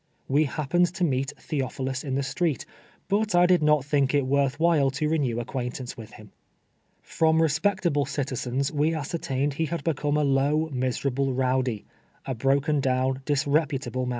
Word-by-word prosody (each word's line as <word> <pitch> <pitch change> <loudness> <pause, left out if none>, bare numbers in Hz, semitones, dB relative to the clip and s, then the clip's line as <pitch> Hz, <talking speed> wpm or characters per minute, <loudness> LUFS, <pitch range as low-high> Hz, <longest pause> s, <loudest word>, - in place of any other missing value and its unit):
We 145 +3 +3
happened 160 +5 +1
to 190 - -1
meet 135 -3 0
Theophilus 135 -2 -3
in 135 -3 -3
the 140 - 0
street, 150 -1 -1 0.4
but 210 -1 +1
I 175 0 +6
did 180 -1 +4
not 150 -1 +4
thiidc 140 -1 +1
it 140 -2 +2
worth 140 +1 +1
while 160 -5 +3
to 145 +3 -2
renew 140 -7 0
acquaintance 125 +1 -5
with 110 -2 -11
him. 105 -2 -14 0.7
From 160 0 +2
respectable 160 -1 +1
citiziMw 135 0 -2
we 155 +2 +1
ascertained 145 -2 -2
he 160 +3 -1
had 160 -1 -4
become 150 -2 0
a 150 - +2
low, 145 +3 +1
miserable 130 +1 -1
row<ly 130 -4 0 0.2
— - - -36
a 135 - -2
broken 140 +5 +1
down, 130 0 0
disreputable 140 -3 0
man. - - -2
140 Hz, 165 wpm, -26 LUFS, 130-155 Hz, 0.7 s, I